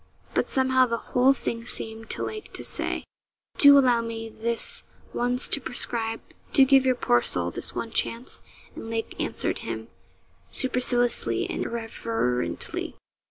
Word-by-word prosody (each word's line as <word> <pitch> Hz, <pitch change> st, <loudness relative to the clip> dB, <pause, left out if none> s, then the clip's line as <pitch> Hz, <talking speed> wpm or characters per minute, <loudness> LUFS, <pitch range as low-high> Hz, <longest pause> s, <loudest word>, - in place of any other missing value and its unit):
But -, -, 0 dB
somehow 260 Hz, -1 st, +3 dB
the 230 Hz, -1 st, -1 dB, 0.2 s
whole 255 Hz, +2 st, +5 dB
thing 230 Hz, -4 st, -3 dB
seemed 225 Hz, -1 st, -5 dB
to -, -, -1 dB
Lake 430 Hz, -1 st, -6 dB
to -, -, -5 dB
say, -, -, 0 dB, 0.6 s
'Do 285 Hz, -1 st, +9 dB
allow 250 Hz, -4 st, +4 dB
me 225 Hz, -1 st, -6 dB
this 230 Hz, +1 st, +1 dB, 0.3 s
once 245 Hz, +2 st, 0 dB
to 280 Hz, -, +3 dB
prescribe; 225 Hz, -2 st, 0 dB, 0.3 s
do 270 Hz, -, +7 dB
give 265 Hz, -1 st, +4 dB
your 255 Hz, -, +3 dB
poor 120 Hz, -, +2 dB
soul 85 Hz, 0 st, 0 dB
this -, -, -5 dB
one 230 Hz, -, -4 dB
chance,' 235 Hz, +2 st, -2 dB, 0.3 s
and 225 Hz, -, -8 dB
Lake 225 Hz, 0 st, -3 dB
answered -, -, -2 dB
him -, -, -6 dB, 0.6 s
superciliously 245 Hz, -2 st, +2 dB
and -, -, -3 dB
irreverently. 225 Hz, -, -3 dB
235 Hz, 145 wpm, -25 LUFS, 225-260 Hz, 0.6 s, Do